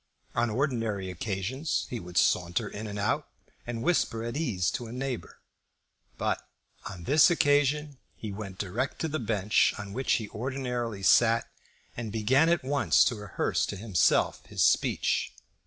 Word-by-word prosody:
On 120 0 +1
ordinary 115 -6 -1
occasions 105 - -2
he 120 - -3
could 90 -2 -7
saunter 90 +5 +2
in 105 +2 -6
and 105 0 -6
out, 100 0 -1 0.4
and 115 -1 -4
whisper 115 -10 +1
at 115 0 -4
his 155 - -1
ease 95 - 0
to 120 - -4
a - - -9
neighbour. 125 -1 -5 0.8
But - - -1 0.5
on 95 -3 -9
this 145 - +6
occasion 145 -3 +2 0.2
he 110 - -6
went 100 -2 -7
direct 105 +8 -2
to 160 - 0
the 155 0 -2
bench 105 -3 +2
on 100 -1 -7
which 130 +4 0
he 110 - 0
ordinarily 120 -3 -3
sat, 115 +3 +4 0.4
and 115 -3 -5
began 130 +9 +3
at 170 -4 +2
once 140 +2 +3
to 120 - +1
rehearse 105 -2 -1
to 100 - -5
himself 100 -4 +2
his - - 0
speech. - - +2
115 Hz, 160 wpm, -28 LUFS, 100-135 Hz, 0.8 s, this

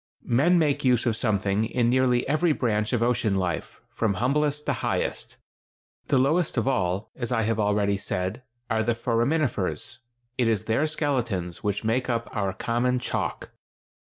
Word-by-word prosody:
Men 150 +10 +3
make 150 -3 +1
use 125 -2 +3
of 115 -3 +1
something 105 -2 0
in 120 +1 0
nearly 125 0 +2
every 155 +2 +2
branch 110 -5 0
of 120 -2 +1
ocean 115 -4 +1
life, 90 -3 -2
from 110 -4 0
humblest 145 +6 0
to - - +1
highest. - - -2 0.7
The 140 - +3
lowest 150 +4 +2
of 115 - +1
all, 95 -5 0
as 120 -1 -4
I 115 -2 +1
have 110 0 0
already 105 -1 +2
said, 95 +3 -3 0.3
are 110 -1 +1
the 115 +1 +1
foraminifers; 120 - -1 0.4
it 120 - +3
is 110 -2 +1
their 115 +8 +1
skeletons 120 - -2
which 100 0 -1
make 120 +4 0
up 115 -1 -2
our 100 -3 0
common 120 +5 0
chalk. 125 - -3
115 Hz, 160 wpm, -26 LUFS, 105-130 Hz, 0.7 s, Men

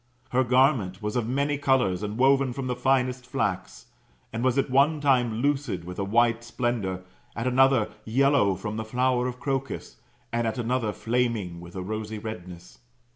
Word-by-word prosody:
Her 130 +1 +3
o^arment 125 -7 +2
was 105 +2 -2
of 120 -3 0
many 140 +3 0
colours, 130 -10 +2
and 105 +1 -4
woven 135 0 +3
from 135 +1 -4
the 125 -1 -1
finest 125 0 +1
flax, 95 - -3 0.5
and 115 +2 -2
was 130 0 +2
at 135 - +1
one 145 +4 +4
time 125 -5 +2
lucid 140 -11 0
with 90 +2 -8
a - - 0
white 115 +3 +2
splendour, 120 -6 -2 0.3
at 115 - -3
another 130 -3 +4 0.2
yellow 130 -4 +3
from 105 +3 -5
the 110 - -2
flower 125 +2 +1
of 125 0 -6
crocus, 135 -1 -3 0.4
and 120 -1 +1
at 110 - -2
another 120 -2 0
flaming 115 -7 -1
with 85 +1 -12
a 95 - -4
rosy 110 +2 -4
redness. 90 -5 -8
120 Hz, 175 wpm, -26 LUFS, 105-130 Hz, 0.5 s, one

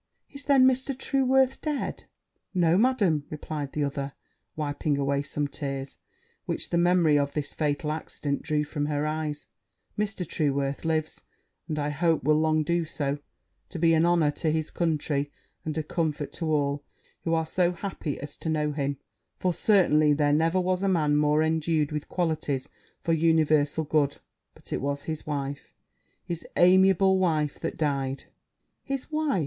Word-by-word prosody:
'Is, 280 0 -7
then, 275 -3 +6
Mr. 260 +1 +1
Trueworth 265 -1 +2
dead?' 300 -3 -3 0.5
'No, 170 -2 +4
Madam,' 200 - +3
replied 150 -2 -5
the 150 - 0
other, 140 -1 -3 0.4
wiping 145 -1 -1
away 140 0 +1
some 145 0 -2
tears 135 -1 -5 0.5
which - - -2
the 170 - +2
memory 170 -4 +4
of 140 0 -1
this 150 -2 -3
fatal 150 0 -1
accident 150 -2 -3
drew 150 -1 0
from 145 0 -3
her 150 0 -1
eyes; 155 -1 -3 0.5
'Mr. 205 -4 -1
Trueworth 140 -2 -1
lives; 155 -1 -1 0.5
and, 155 -3 -3
I 145 0 0
hope, 165 +2 +1
will 150 +2 +4
long 155 0 +2
do 170 +2 +1
so, 145 -3 -2 0.5
to 180 - -6
be 165 0 +4
an 160 0 +4
honour 170 -3 +3
to 160 - +2
his 160 0 -1
country, 150 -4 0 0.3
and 155 0 -4
a 155 - 0
comfort 155 -2 -2
to 165 -2 -2
all 145 -2 +1
those 145 - -24 0.4
who 165 - +1
are 160 0 +1
so 175 +2 +1
happy 175 -5 -4
as 145 0 -7
to 160 - -4
know 150 -1 0
him; 140 -1 -2 0.4
for 180 -1 0
certainly 155 -8 +4
there 145 0 +2
never 165 +4 +2
was 185 0 0
a 195 - +1
man 155 -5 +2
more 150 +1 +3
endued 160 -1 +1
with 150 -1 -4
qualities 155 -6 -1 0.3
for 165 - -1
universal 155 -2 +3
good: 145 -2 +1 0.4
but - - -9
it - - -1
was 140 +1 -2
his 155 -1 -5
wife, 140 -1 -4 0.5
his 170 -1 -5
amiable 190 +1 +5
wife, 155 -5 +1
that - - -4
died!' 140 -3 -1 0.6
'His 275 +2 -4
wife!' 305 -8 +1
155 Hz, 165 wpm, -27 LUFS, 145-175 Hz, 0.6 s, then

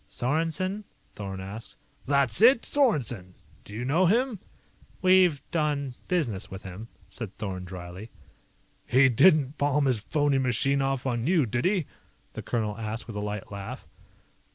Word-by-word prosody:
"Sorensen?" 165 +9 -1 0.3
Thorn 95 -2 -6
asked. 100 +4 -8 0.3
"That's 140 - +2
it! 240 +2 +6
Sorensen! 125 - +1 0.3
Do - - -14
you 115 +4 -4
know 165 +8 +3
him?" 235 +2 +1 0.6
"We've 185 -6 +5
done 145 -5 -1
business 120 - -1
with 95 0 -9
him," 100 +4 -8 0.2
said 110 -6 -8
Thorn 95 -3 -5
dryly. 90 +3 -9 0.8
"He 130 +1 +5
didn't 145 +2 +4
palm 145 0 +2
his 125 -5 +1
phony 145 +5 +1
machine 135 +2 +1
off 135 -1 -1
on 120 -1 -1
you, 170 -5 +3
did 120 +2 -2
he?" 185 -4 +2 0.5
the - - -6
colonel 110 -3 -2
asked 110 +1 -4
with 115 - -8
a - - -2
light 105 -1 -5
laugh. 100 -1 -7
130 Hz, 150 wpm, -27 LUFS, 105-155 Hz, 0.8 s, it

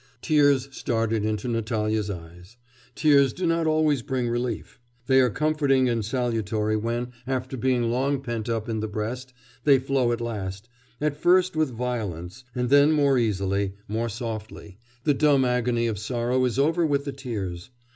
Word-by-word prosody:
Tears 145 -3 +3
started 115 -2 -1
into 110 +3 -2
Natalya's 110 -2 -1
eyes. 90 +4 -9 0.4
Tears 140 -3 +4
do 185 - -3
not 165 -1 +1
always 155 -3 +2
bring 130 -2 -2
relief. 120 +1 -3 0.3
They 130 0 +5
are 125 - +3
comforting 140 -1 +2
and 115 -2 0
salutary 110 -3 -1
when, 120 +3 -2 0.2
after 130 0 -2
being 120 -1 +1
long 135 +3 0
pent 120 -3 -4
up 115 -2 -2
in 110 -1 -2
the 110 - -2
breast, 115 +5 -4 0.3
they 140 -2 +6
flow 130 -2 +1
at 120 - -1
last 105 -3 -5 0.3
at 150 -1 0
first 185 0 +4
with 155 -2 +1
violence, 115 -4 -4
and 125 0 -1
then 145 +2 +6
more 140 -3 +3
easily, 100 -3 0
more 115 +3 -2
softly; 110 -3 -7 0.2
the 150 - +3
dumb 140 -2 +3
agony 125 -1 +1
of 110 -4 -2
sorrow 120 +3 0
is 125 -1 -1
over 160 +5 +2
with 140 -3 +1
the 140 - -4
tears. 105 -9 -5
120 Hz, 165 wpm, -25 LUFS, 110-135 Hz, 0.4 s, they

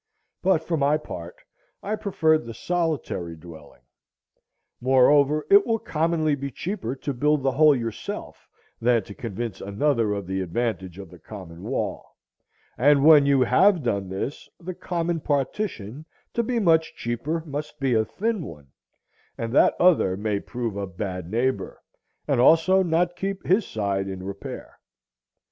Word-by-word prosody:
But 180 -4 +2
for 165 0 -1
my 145 +1 +2
part, 85 - -8 0.5
I 210 +2 -1
preferred 160 - +1
the 115 - -7
solitary 155 - -2
dwelling. 80 -6 -14 1.0
Moreover, 140 +4 +4
it 400 0 +8
will 225 -8 0
commonly 160 -4 0
be 140 0 -3
cheaper 165 - -4
to 140 +1 -4
build 150 +2 +1
the 135 - +2
whole 150 +2 +5
yourself 115 -3 -6 0.3
than 115 -2 +3
to 100 - -10
convince 115 0 -5
another 110 +1 0
of 100 -2 -4
the 95 +1 -2
advantage 95 -1 -3
of 95 -4 -10
the 90 - -14
common 90 -2 -10
wall; - - -4 0.6
and 140 +2 +5
when 150 -3 +7
you 140 -2 +4
have 175 - +4
done 100 -5 -1
this, 95 +9 -5
the 185 +1 -6
common 170 -1 -2
partition, 145 - -3 0.3
to 235 - +1
be 240 +1 -2
much 165 -6 +2
cheaper, 140 +8 -3
must 150 0 -6
be 135 -2 +1
a 110 -1 +3
thin 205 - -2
one, 75 - -11 0.7
and 115 0 -4
that - - +5
other 160 - +4
may 105 0 -1
prove 115 -1 -4
a 100 -1 -3
bad 90 -1 -5
neighbor, 125 +5 -1 0.5
and - - +2
also 165 +7 +5
not 175 0 +1
keep 195 +1 -4
his 190 +2 +2
side 100 -2 -2
in 95 -1 -6
repair. 100 +1 -8
135 Hz, 155 wpm, -24 LUFS, 100-165 Hz, 1.0 s, it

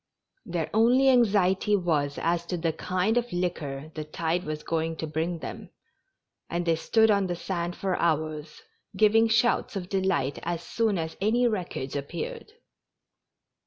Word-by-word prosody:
Their - - -2
only 245 +5 +5
anxiety 205 -4 +3
was 155 -7 0
as 170 0 0
to 180 - -2
the 165 -1 -1
kind 185 +7 0
of 240 0 -6
liquor 155 -5 -3
the 155 - -4
tide 165 +3 -2
was 150 0 -4
going 165 0 -1
to 160 - -4
bring 160 +3 -2
them, - - -8 0.8
and 175 0 -2
they 165 -1 +3
stood 220 +7 +3
on 200 -2 +2
the 175 - -2
sand 175 -1 -3
for 190 -2 -1
hours, 155 -2 -1 0.3
giving 220 +1 +5
shouts 225 0 +2
of 185 -2 -4
delight 185 -8 0
as 170 0 -3
soon 220 -4 0
as 160 -1 -3
any 235 +4 +3
wreckage 180 - -3
appeared. 455 - -5
175 Hz, 155 wpm, -27 LUFS, 160-210 Hz, 0.8 s, only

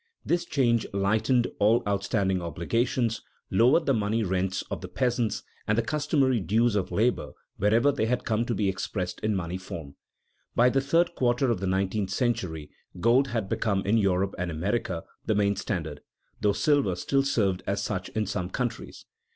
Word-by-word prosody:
This 175 0 +1
change 120 -8 +1
lightened 110 +5 +2
all 110 +3 +4
outstanding 100 -2 0
obligations, 115 +7 -1 0.3
lowered 125 - +4
the 135 - +3
money 110 0 0
rents 95 0 -1
of - - -3
the - - -6
peasants, 120 -3 -1 0.2
and 110 - +2
the 115 - +2
customary 140 -1 +1
dues 110 +5 +2
of 100 -3 -1
labor 120 +4 0 0.2
wherever 115 +8 +3
they 120 -5 -1
had 125 +1 -1
come 110 -1 +1
to 120 - -1
be 100 0 0
expressed 95 -1 -3
in 110 -1 0
money 90 0 -3
form. 80 -6 -8 0.6
By 125 +1 +5
the 135 +2 +1
third 165 +5 +2
quarter 125 0 +1
of 115 - -1
the 95 - -2
nineteenth 95 +1 0
century 95 - -2 0.3
gold 120 +7 +4
had 115 -6 -2
become 100 -1 0
in 110 +3 +3
Europe 95 -1 +1
and 90 0 -2
America 85 +1 -2 0.2
the 110 - +2
main 100 0 +2
standard, 80 -7 -4 0.4
though 105 -1 +3
silver 140 - +2
still 135 +10 +1
served 100 -9 +1
as 100 0 -1
such 95 -3 -3
in 110 -1 -1
some 90 -3 -3
countries. 125 +2 -4
110 Hz, 175 wpm, -27 LUFS, 95-120 Hz, 0.6 s, By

